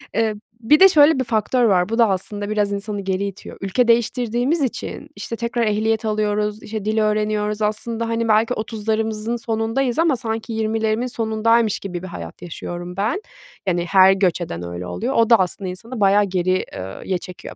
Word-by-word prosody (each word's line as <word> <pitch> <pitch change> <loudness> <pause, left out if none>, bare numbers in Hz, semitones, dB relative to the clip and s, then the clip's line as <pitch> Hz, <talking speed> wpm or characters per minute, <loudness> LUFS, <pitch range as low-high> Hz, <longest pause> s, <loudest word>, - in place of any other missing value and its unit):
Eee, 220 -1 +1 0.3
bir 295 +7 +5
de 385 - +9
şöyle 295 -3 +5
bir - - +2
faktör 235 +1 +1
var, 185 -5 +3
bu 225 - -1
da 230 -3 +5
aslında 205 +2 -3
biraz 210 -1 0
insanı 200 0 -3
geri 190 0 -1
itiyor. 195 -1 -8
Ülke 195 +6 +1
değiştirdiğimiz 240 +5 +1
için, 260 -4 -4
işte, 230 - -5
tekrar 235 +1 -1
ehliyet 220 +2 0
alıyoruz, 210 0 -1
işte, 215 -1 -5
dil 215 +1 0
öğreniyoruz. 210 0 0
Aslında, 225 +2 -1
hani, 230 0 -1
belki 220 +2 +3
30'larımızın 220 0 -2
sonundayız 230 +3 -1
ama 330 -4 +3
sanki 225 -1 -4
20'lerimin 220 +1 0
sonundaymış 225 -1 +1
gibi 180 -3 -6
bir - - -5
hayat 85 - -9
yaşıyorum 175 +1 -7
ben. 220 - 0 0.5
Yani, 175 -2 +1
her 190 0 +7
göç 190 -2 +1
eden 90 - -5
öyle 85 +1 -6
oluyor. 90 0 -3
O 230 -1 +3
da 235 - +8
aslında 185 +1 -2
insanı 225 +7 -7
bayağı 200 +1 +4
geri 185 -1 0
eee, 95 +1 -6
ye 185 - 0
çekiyor 180 0 -10
215 Hz, 180 wpm, -21 LUFS, 195-230 Hz, 0.5 s, de